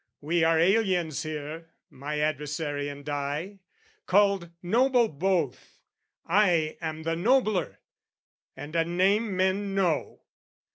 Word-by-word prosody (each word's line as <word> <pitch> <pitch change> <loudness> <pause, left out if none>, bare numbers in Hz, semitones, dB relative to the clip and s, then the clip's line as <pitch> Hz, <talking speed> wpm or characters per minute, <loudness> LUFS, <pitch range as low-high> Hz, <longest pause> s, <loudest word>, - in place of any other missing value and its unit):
We 165 +3 +1
are 165 0 +4
aliens 180 -4 +2
here, 155 +1 -6 0.2
"My 145 +3 -5
adversary 150 -1 -2
and 145 0 -10
I, 145 +7 -3 0.5
called 200 -2 +3
noble 240 +5 +3
both; 170 - -2 0.5
"I 170 -4 +2
am 160 -1 -4
the 165 +1 -1
nobler, 215 +1 +1 0.8
and 150 +3 -8
a 165 - +3
name 190 +4 +1
men 195 +1 0
know. 180 -6 0
170 Hz, 110 wpm, -27 LUFS, 150-195 Hz, 0.8 s, are